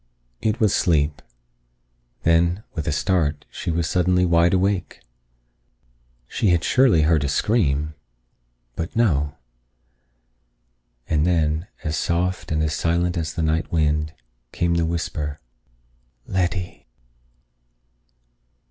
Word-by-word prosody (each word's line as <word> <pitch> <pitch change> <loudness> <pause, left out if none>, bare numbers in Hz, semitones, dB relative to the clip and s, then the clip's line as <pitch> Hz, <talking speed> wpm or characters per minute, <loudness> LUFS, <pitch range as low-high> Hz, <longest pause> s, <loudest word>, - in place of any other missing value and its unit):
It 110 0 0
was 105 -3 +3
sleep. 75 -3 +1 1.0
Then, 85 +4 +2
with 80 -5 -4
a - - +1
start, 75 -1 0
she - - -5
was 85 -1 0
suddenly 90 0 +2
wide 85 0 +4
awake. 95 -1 0 1.3
She 105 - 0
had 85 -2 +2
surely 125 - +4
heard 80 -1 +3
a 70 - -1
scream. 75 - +1 0.8
But 85 +1 -5
no. 75 -11 +1 1.7
And 75 -1 +1
then, 80 0 +1 0.2
as 75 -2 -2
soft 90 +1 -1
and 80 0 +1
as 75 -1 0
silent 85 +2 0
as 80 -3 -3
the 80 - -1
night 80 +1 0
wind, 75 -1 0 0.4
came 85 0 0
the 85 -1 +1
whisper: 75 -3 -3 0.9
"Letty." 90 -1 -2
85 Hz, 110 wpm, -22 LUFS, 75-90 Hz, 1.7 s, wide